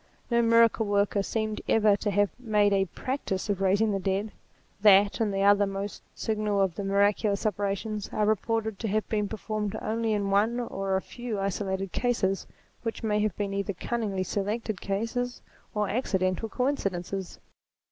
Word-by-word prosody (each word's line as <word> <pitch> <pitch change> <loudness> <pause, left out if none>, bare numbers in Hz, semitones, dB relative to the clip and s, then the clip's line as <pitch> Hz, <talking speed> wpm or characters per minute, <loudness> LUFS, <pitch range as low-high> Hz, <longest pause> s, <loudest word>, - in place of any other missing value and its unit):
No 235 0 +4
miracle 230 -1 +4
worker 200 0 +2
seems 215 +1 -2
ever 215 -2 +5
to 205 - -1
have 205 0 +2
made 210 -4 +2
a 195 -1 +3
practice 210 - -3
of 195 -1 -2
raising 200 +3 +3
the 195 - 0
dead: 195 +3 -1 0.5
that 200 0 +6
and 220 -3 +1
the 195 0 0
other 205 0 +5
most 195 +1 -5
signal 215 -2 -1
of 190 -3 +2
the 200 - -5
miraculous 200 +1 +2
operations 205 +1 -2
are 210 - +1
reported 220 0 0
to 225 - -2
have 215 +1 0
been 210 -2 0
performed 215 -1 -3
only 225 0 -1
in 200 -1 0
one 220 +5 +2
or 195 -5 -2
a 190 - 0
few 240 -4 -5
isolated 195 -1 -2
cases, 195 -6 0 0.3
which 225 +1 -4
may 210 -1 +1
have 210 -3 0
been 200 -1 -2
either 200 0 -1
cunningly 200 -1 -2
selected 205 +2 -2
cases, 230 +5 -2 0.4
or 210 -1 +1
accidental 195 -2 0
coincidences. 195 -9 -2
205 Hz, 165 wpm, -28 LUFS, 195-220 Hz, 0.5 s, that